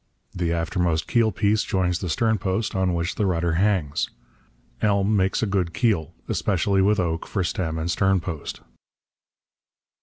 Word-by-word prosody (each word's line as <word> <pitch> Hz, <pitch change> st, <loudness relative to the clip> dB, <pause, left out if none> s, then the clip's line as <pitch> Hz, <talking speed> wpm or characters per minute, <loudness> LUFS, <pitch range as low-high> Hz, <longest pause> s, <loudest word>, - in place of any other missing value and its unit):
The 85 Hz, -2 st, -1 dB
aftermost 85 Hz, -1 st, 0 dB
keel 115 Hz, -2 st, +3 dB
piece 105 Hz, +2 st, +2 dB
joins 90 Hz, -2 st, 0 dB
the 90 Hz, -, -4 dB
stern 110 Hz, +4 st, +1 dB
post, 95 Hz, +3 st, -1 dB
on 95 Hz, -2 st, +1 dB
which 85 Hz, +2 st, -1 dB
the 105 Hz, -, 0 dB
rudder 85 Hz, -2 st, 0 dB
hangs. 85 Hz, -5 st, +1 dB, 0.7 s
Elm 100 Hz, 0 st, +2 dB
makes 95 Hz, +1 st, +1 dB
a -, -, +3 dB
good 95 Hz, -4 st, -1 dB
keel, 105 Hz, -, 0 dB
especially 95 Hz, 0 st, +1 dB
with 105 Hz, +2 st, +3 dB
oak 85 Hz, -2 st, -1 dB
for 95 Hz, -, -1 dB
stem 80 Hz, -2 st, -2 dB
and 80 Hz, +2 st, -1 dB
stern 95 Hz, +2 st, +2 dB
post. 80 Hz, -5 st, -6 dB
95 Hz, 155 wpm, -24 LUFS, 85-100 Hz, 0.7 s, keel